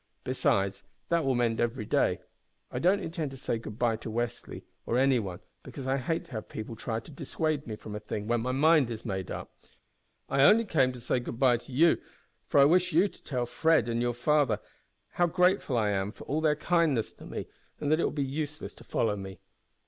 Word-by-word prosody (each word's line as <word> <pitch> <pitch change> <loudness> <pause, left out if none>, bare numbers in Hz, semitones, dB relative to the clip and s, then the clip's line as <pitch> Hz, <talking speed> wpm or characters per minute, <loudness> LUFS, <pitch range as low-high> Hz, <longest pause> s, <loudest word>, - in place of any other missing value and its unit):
Besides, 95 0 +1 0.3
that 170 -1 +2
will 135 -1 +1
mend 120 -2 +1
every 120 -1 -1
day. - - +1 0.5
I - - -3
don't 190 +4 +3
intend 160 -3 -3
to 135 - -10
say 120 -3 -2
goodbye 115 +1 -1
to 110 - -7
Westly 120 +1 -4 0.2
or 120 - +1
any 135 -1 +4
one, 95 -5 -5 0.2
because 135 - -8
I 135 +1 +1
hate 160 +5 -2
to - - -20
have 110 -2 -6
people 110 +1 -6
try 110 0 -3
to 155 - -14
dissuade 155 0 -2
me 110 - -4
from 105 0 -9
a - - -3
thing 105 0 -5
when 120 +1 +1
my 125 +2 -1
mind 150 0 +4
is 115 -1 -6
made 95 -4 -3
up. - - -7 0.7
I 135 0 +3
only 225 +9 +6
came 135 -9 +2
to 125 - -9
say 120 +2 0
good 120 -1 -6
bye 125 -2 +5
to 120 - -14
you, 160 +6 +4 0.5
because 140 - +5
I - - +7
wish 180 +4 +3
you 175 +6 +4
to - - -21
tell 125 -4 -2
Fred 160 0 +2
and 115 0 0
your 120 -1 0
father 145 -3 +2
that 175 - -13
I - - +7
am - - -1
grateful 120 - +2
for - - -11
all 155 +3 -1
their 155 -1 +3
kindness 155 -7 +1
to - - -13
me, - - -5 0.3
and 145 - -1
that 155 - +4
it - - +2
will - - +2
be 145 -1 -1
useless 150 +2 -4
to - - -15
follow 110 -3 0
me. 95 -1 -7
130 Hz, 225 wpm, -29 LUFS, 115-155 Hz, 0.7 s, I